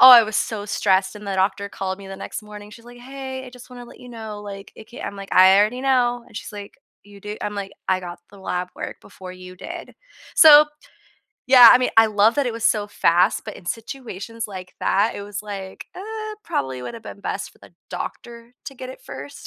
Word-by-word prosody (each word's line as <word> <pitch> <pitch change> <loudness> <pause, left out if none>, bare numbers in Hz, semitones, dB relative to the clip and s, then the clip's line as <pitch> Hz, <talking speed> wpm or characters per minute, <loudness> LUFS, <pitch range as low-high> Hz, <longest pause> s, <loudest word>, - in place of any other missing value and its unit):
Oh, 255 0 +12
I 240 -2 +11
was 215 -1 -3
so 210 -3 -2
stressed, 190 -1 +1
and 210 0 -11
the 195 - -2
doctor 195 +1 0
called 190 -1 -4
me 195 - -11
the 195 - -7
next - - -6
morning, 210 0 -11
she's 230 +2 -14
like, 245 0 -13
"Hey, 265 +1 -7
I - - -10
just 250 0 -14
wanna 245 -1 -10
let - - -15
you 250 - -12
know, 220 -3 -8
like, 200 -1 -9
it 220 - -13
can't" 245 - -7
I'm 200 - -6
like, 195 0 -9
"I 190 +1 +7
already 215 +5 +2
know." 245 -3 +2
And 210 - -14
she's - - -7
like, 205 -1 -9 0.3
"You 200 -1 -15
do?" 210 +1 -6
I'm 210 - -3
like, 195 -1 -5 0.2
"I 185 0 +3
got 175 -1 -8
the 200 - -15
lab 180 -1 -3
work - - -6
before 185 -1 -11
you 185 0 -12
did." 340 - -8 0.4
So, 300 -2 +9 0.8
yeah, 250 -2 +10
I - - +6
mean, 255 - 0
I 225 - +8
love 215 +1 +3
that 280 -3 +1
it 240 - -1
was 230 0 -6
so 210 -3 +2
fast, 175 -3 +2
but - - -7
in 175 - -15
situations 230 -1 -6
like 185 -2 -9
that, 205 +4 +2
it 200 - -6
was 205 0 -6
like, 195 -2 -7
uh, 430 +2 -6
probably 130 - -2
would 235 - -6
have 230 - -10
been 200 - -9
best - - -4
for - - -26
the - - -17 0.2
doctor 235 0 -7
to 270 - -7
get 255 0 -8
it 260 - -12
first. 140 +2 -9
210 Hz, 235 wpm, -22 LUFS, 195-245 Hz, 0.8 s, Oh